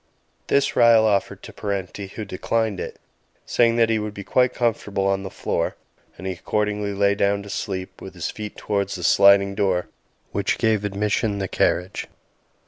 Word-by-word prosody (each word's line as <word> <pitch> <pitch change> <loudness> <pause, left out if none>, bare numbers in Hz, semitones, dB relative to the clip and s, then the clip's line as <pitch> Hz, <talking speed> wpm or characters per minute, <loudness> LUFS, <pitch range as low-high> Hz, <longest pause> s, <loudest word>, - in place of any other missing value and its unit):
This 140 0 +2
Ryall 115 -2 +6
offered 100 -2 0
to - - -10
Parenti, 100 -1 -4
who 105 +2 -7
declined 110 +1 -1
it, - - -6 0.5
saying 115 -1 +3
that 115 -1 +3
he 110 - +2
would 105 0 -5
be 100 - -6
quite 125 +4 +2
comfortable 105 -5 -1
on 95 0 +1
the 95 - -6
floor - - -2 0.4
and 95 - -9
he 95 - -1
accordingly 105 +2 -1
lay 100 0 +3
down 100 0 +1
to 100 - -9
sleep, 95 -2 -5
with - - -9
his - - -3
feet 105 -1 -7
towards 100 -2 -1
the 90 - -6
sliding 100 +1 +5
door 95 -3 0 0.4
which - - 0
gave 110 -2 +1
admission 105 +1 0
the 95 -1 -2
carriage. 90 +1 0
100 Hz, 175 wpm, -23 LUFS, 100-110 Hz, 0.5 s, Ryall